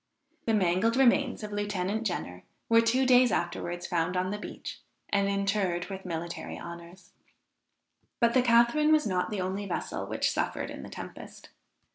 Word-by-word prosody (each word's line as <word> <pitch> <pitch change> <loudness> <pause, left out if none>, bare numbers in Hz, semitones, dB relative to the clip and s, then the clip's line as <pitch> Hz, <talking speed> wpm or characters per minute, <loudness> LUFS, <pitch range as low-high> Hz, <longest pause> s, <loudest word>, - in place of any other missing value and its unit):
The 225 - +3
mangled 190 +4 +2
remains 255 -3 +3
of 210 - -5
Lieutenant 205 +1 -1
Jenner 90 - -4 0.3
were 230 0 +6
two 250 +3 +2
days 250 -1 +6
afterwards 175 0 -2
found 175 0 0
on 185 +1 0
the 210 - -3
beach, - - -8 0.3
and 200 -1 +2
interred 195 -2 0
with 190 0 -7
military 170 -1 -5
honors. 170 +1 -10 1.1
But 235 -1 +3
the 255 - +5
Catharine 240 +6 +4
was 310 -1 +4
not 185 -1 0
the 210 -3 -2
only 190 +2 -3
vessel 180 - -3
which - - 0
suffered - - -2
in - - -7
the - - -9
tempest. - - -10
200 Hz, 160 wpm, -29 LUFS, 180-230 Hz, 1.1 s, were